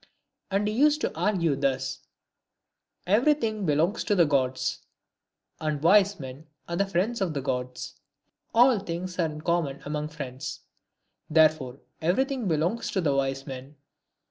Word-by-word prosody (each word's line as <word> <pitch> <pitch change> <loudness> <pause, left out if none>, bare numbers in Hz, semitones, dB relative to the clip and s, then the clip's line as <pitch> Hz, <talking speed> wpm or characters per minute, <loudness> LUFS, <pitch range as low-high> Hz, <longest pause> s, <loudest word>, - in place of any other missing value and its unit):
And 200 +1 +1
he 210 - -1
used 295 +5 +4
to - - -2
argue 170 -3 +1
thus, 135 -1 -1 0.4
— - - -59
" - - -49
Everything 225 - +1
belongs 155 +7 +1
to 205 - +2
the 175 -3 +5
gods; 130 -3 0 0.8
and 155 -2 -1
wise 200 +2 +5
men 135 +3 -9 0.2
are 170 - -3
the 200 +3 +1
friends 195 +5 0
of 175 -5 -1
the 140 - -1
gods. 125 -1 -4 0.5
All 240 0 +5
things 180 0 -5
are 165 - +3
in 155 0 -7
common 160 -5 0
among 150 +1 -2
friends; 140 -4 -6 0.7
therefore 155 -5 +3 0.2
everything 255 - 0
belongs 170 +7 0
to 190 - +1
wise 135 -2 0
men." 135 +1 -8
165 Hz, 145 wpm, -27 LUFS, 140-200 Hz, 0.8 s, the